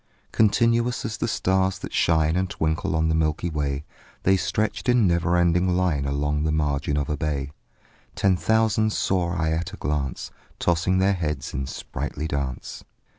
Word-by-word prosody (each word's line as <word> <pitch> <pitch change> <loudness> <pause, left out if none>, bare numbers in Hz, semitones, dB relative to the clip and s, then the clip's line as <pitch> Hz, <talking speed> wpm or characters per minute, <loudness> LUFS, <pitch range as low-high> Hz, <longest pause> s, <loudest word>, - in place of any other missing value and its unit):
Continuous 115 +2 +2
as 110 -1 -3
the 115 - -1
stars 95 -3 +1
that - - -8
shine 80 0 +2
And 95 0 0
twinkle 80 -1 -1
on 80 0 +2
the 80 - +1
milky 80 +2 0
way, 70 -1 -2 0.4
The 95 - +4
stretched 110 +5 -1
in 120 -3 +4
never 85 0 +2
ending 90 +1 +2
line 85 -7 +1
Along 75 +1 -1
the 80 - +1
margin 75 -1 0
of 70 -2 -1
a 75 - -1
bay: 70 -2 -2 0.6
Ten 95 -1 +3
thousand 110 +1 +2
saw 90 -2 0
I 80 -2 0
at 85 +4 -2
a - - -7
glance, 75 -3 -3 0.3
Tossing 90 +2 +1
their 95 +2 +3
heads 75 -7 -3
in 65 +1 -3
sprightly 75 +2 -5
dance. 70 -4 -4
85 Hz, 170 wpm, -24 LUFS, 75-95 Hz, 0.6 s, The